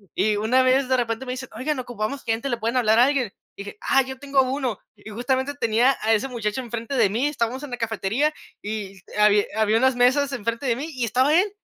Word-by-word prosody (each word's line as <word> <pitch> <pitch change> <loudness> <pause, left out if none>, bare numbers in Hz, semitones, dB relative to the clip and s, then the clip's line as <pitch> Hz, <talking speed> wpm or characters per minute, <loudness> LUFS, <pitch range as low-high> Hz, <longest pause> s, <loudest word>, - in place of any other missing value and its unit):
Y 215 0 +2
una 235 +5 +3
vez, 260 +1 +2
de 260 - +3
repente 235 +1 -2
me 250 - -4
dicen: 260 0 -6
"Oigan, 265 +3 -2
ocupamos 245 +2 -4
gente, 225 +4 -1
¿le 240 - -1
pueden 230 +3 -2
hablar 220 -1 +3
a 245 - +7
alguien?". 265 -7 0 0.3
Dije: 200 +1 -8
"Ah, 270 - +3
yo 265 0 -8
tengo 275 -1 +2
1," 255 -4 -2 0.2
y 210 +1 -12
justamente 260 +5 -1
tenía 240 +2 +2
a 220 - +1
ese 225 +5 +1
muchacho 225 -1 -3
enfrente 235 +2 -5
de 200 - +4
mí, 240 +8 0
estábamos 260 -1 -2
en 280 - -8
la 245 - -4
cafetería 230 +6 -1 0.3
y 205 -2 -5 0.2
habi 210 -1 +4
había 220 0 +3
unas 260 +1 +3
mesas 260 +3 +3
enfrente 230 +2 -3
de 235 - +2
mí 295 +4 -4
y 250 -2 -1
estaba 255 +6 +2
él, 405 +3 +1
245 Hz, 225 wpm, -23 LUFS, 220-265 Hz, 0.3 s, a